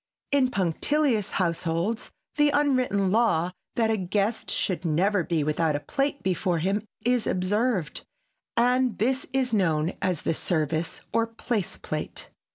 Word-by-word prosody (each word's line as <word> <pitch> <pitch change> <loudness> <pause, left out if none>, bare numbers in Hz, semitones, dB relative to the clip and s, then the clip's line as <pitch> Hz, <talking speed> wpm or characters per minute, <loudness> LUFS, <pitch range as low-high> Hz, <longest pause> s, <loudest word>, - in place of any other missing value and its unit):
In 275 -3 +3
punctilious 225 - +1
households 170 +5 -1 0.3
the 295 -1 +4
unwritten 255 -10 +2
law 185 -6 +2 0.2
that 225 -1 +2
a 220 - +1
guest 200 +4 -1
should 185 -2 -1
never 180 +4 +2
be 165 -2 0
without 155 +1 +1
a - - 0
plate 275 - -2
before 180 -1 0
him 195 +6 0 0.2
is 245 -2 +2
observed, 190 -2 0 0.6
and 250 +1 +3
this 260 +4 0
is 260 -2 0
known 165 -4 +2
as 185 -5 -1
the - - +1
service 160 -1 -1
or 230 0 +2
place 225 -3 -3
plate. - - -5
200 Hz, 140 wpm, -26 LUFS, 170-245 Hz, 0.6 s, the